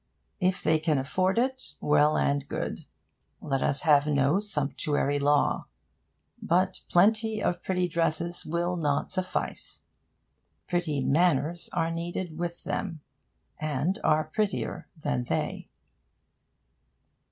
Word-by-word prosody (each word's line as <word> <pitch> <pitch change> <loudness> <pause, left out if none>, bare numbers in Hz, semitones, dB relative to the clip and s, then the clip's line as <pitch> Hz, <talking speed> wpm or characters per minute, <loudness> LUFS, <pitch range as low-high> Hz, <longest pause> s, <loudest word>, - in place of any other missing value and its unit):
If 185 -1 +1
they 160 0 +3
can 155 -2 +1
afford 185 +9 0
it, 260 +2 0
well 150 +1 +3
and 140 0 +1
good: - - -4 0.5
let 135 -3 -1
us 140 - 0
have 150 -3 +5
no 145 +4 +3
sumptuary 145 -6 0
law. 145 +1 +2 0.7
But 185 +2 +1
plenty 215 +4 +3
of 175 -3 -1
pretty 180 -1 0
dresses 170 0 -1
will 175 +2 -1
not 145 -4 0
suffice. 185 -1 -3 0.9
Pretty 170 -6 0
manners 165 +2 +2
are 165 0 0
needed 170 0 -4
with 175 -1 -4
them, 165 -6 -3 0.6
and 155 - -1
are 155 0 +3
prettier 195 +6 -2
than 145 -5 -1
they. - - -2
165 Hz, 115 wpm, -28 LUFS, 145-180 Hz, 0.9 s, have